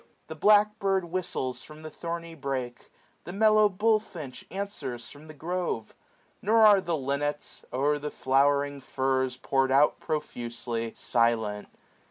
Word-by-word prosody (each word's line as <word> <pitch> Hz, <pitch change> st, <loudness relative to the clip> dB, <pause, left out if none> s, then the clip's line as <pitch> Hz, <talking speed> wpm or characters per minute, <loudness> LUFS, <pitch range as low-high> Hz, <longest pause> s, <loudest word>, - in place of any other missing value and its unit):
600 -, -, -41 dB
The 160 Hz, -, -6 dB
black 210 Hz, +1 st, +5 dB
bird 195 Hz, -3 st, +1 dB
whistles 165 Hz, -8 st, -3 dB
from 155 Hz, +1 st, -12 dB
the 155 Hz, -, -7 dB
thorny 170 Hz, 0 st, -5 dB
brake; 130 Hz, -5 st, -5 dB, 0.4 s
The 175 Hz, -, -6 dB
mellow 215 Hz, 0 st, +5 dB
bullfinch 200 Hz, -, -1 dB
answers 190 Hz, -, -5 dB
from 150 Hz, +2 st, -14 dB
the 155 Hz, -, -11 dB
grove: 165 Hz, -8 st, -3 dB, 0.5 s
Nor 220 Hz, +2 st, +5 dB
are 205 Hz, -2 st, +7 dB
the 170 Hz, -3 st, -1 dB
linnets, 145 Hz, +2 st, -3 dB
o'er 145 Hz, +3 st, +1 dB
the 150 Hz, +1 st, -4 dB
flowering 140 Hz, +1 st, +1 dB
furze 130 Hz, -1 st, -1 dB
Pour'd 135 Hz, +1 st, +1 dB
out 140 Hz, +2 st, +4 dB
profusely, 120 Hz, -6 st, -4 dB
silent. 110 Hz, -3 st, 0 dB
145 Hz, 140 wpm, -28 LUFS, 130-185 Hz, 0.5 s, are